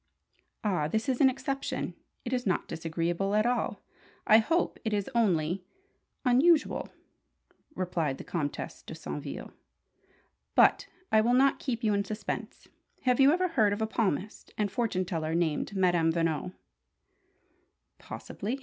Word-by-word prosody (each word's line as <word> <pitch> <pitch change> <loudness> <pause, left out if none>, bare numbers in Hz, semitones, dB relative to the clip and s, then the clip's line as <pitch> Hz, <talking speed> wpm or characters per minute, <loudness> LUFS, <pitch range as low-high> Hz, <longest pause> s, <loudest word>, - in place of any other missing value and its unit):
"Ah, 180 -8 +1
this 220 - -1
is 260 0 0
an 270 - +7
exception! 275 +1 -3 0.3
It 245 - -3
is 250 -3 -1
not 185 - 0
disagreeable 170 +4 -1
at 215 +1 +3
all 245 0 -1 0.4
I 220 - +7
hope. 325 +10 0
It 220 - -1
is 205 +3 -1
only 180 -6 +1 0.6
unusual," 290 +6 +3 0.9
replied 165 -7 -1
the - - -8
Comtesse 150 -5 -4
de - - -9
Saintville. - - -6 1.0
"But - - +5 0.2
I 220 - +6
will 240 +3 +3
not 270 +1 +4
keep 240 -3 -3
you 215 -2 +3
in 200 0 +1
suspense. 210 +2 -5 0.4
Have 250 -1 +2
you 275 +1 +7
ever 365 +2 +1
heard 220 -10 +3
of 205 - -4
a - - +2
palmist 210 -3 -2
and 210 -2 0
fortune 200 -4 0
teller 165 -3 -2
named 170 +3 0
Madame 175 -3 +3
Veno?" 165 +1 -1 1.5
"Possibly. 235 +7 -5
210 Hz, 140 wpm, -29 LUFS, 175-245 Hz, 1.5 s, an